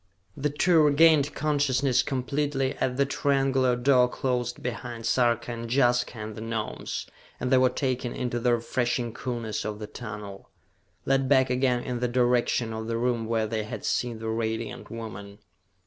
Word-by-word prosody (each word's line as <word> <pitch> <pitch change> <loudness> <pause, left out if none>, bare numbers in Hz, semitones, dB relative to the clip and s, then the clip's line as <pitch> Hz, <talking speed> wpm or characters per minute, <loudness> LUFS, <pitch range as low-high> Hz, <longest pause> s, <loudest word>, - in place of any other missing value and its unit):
The 150 +1 -1
two 160 +3 +3
regained 150 0 +5
consciousness 140 -4 +2
completely 135 +1 -1
as 125 0 -1
the 140 - +3
triangular 135 -2 +1
door 125 0 +4
closed 125 -2 -2
behind 120 -1 -5
Sarka 120 0 +1
and 115 0 -6
Jaska 120 -2 +2
and 110 0 -6
the 110 - -7
Gnomes, 115 -1 -4 0.3
and 125 - -2
they 130 - +6
were 130 0 +5
taken 125 -2 -2
into 120 -1 -2
the 120 0 +3
refreshing 120 0 -1
coolness 115 -3 -4
of 105 -1 -4
the 105 - -6
tunnel, 105 -3 -8 0.6
led 135 -1 +2
back 130 -2 +4
again 125 -1 +1
in 125 -1 -3
the 125 - 0
direction 120 -1 +1
of 110 0 -5
the 115 0 -1
room 120 -1 0
where 115 -1 +1
they 110 0 -2
had 105 - -6
seen 120 -2 -1
the 110 0 -6
Radiant 110 -1 -3
Woman. 100 -3 -8
125 Hz, 165 wpm, -27 LUFS, 115-130 Hz, 0.6 s, they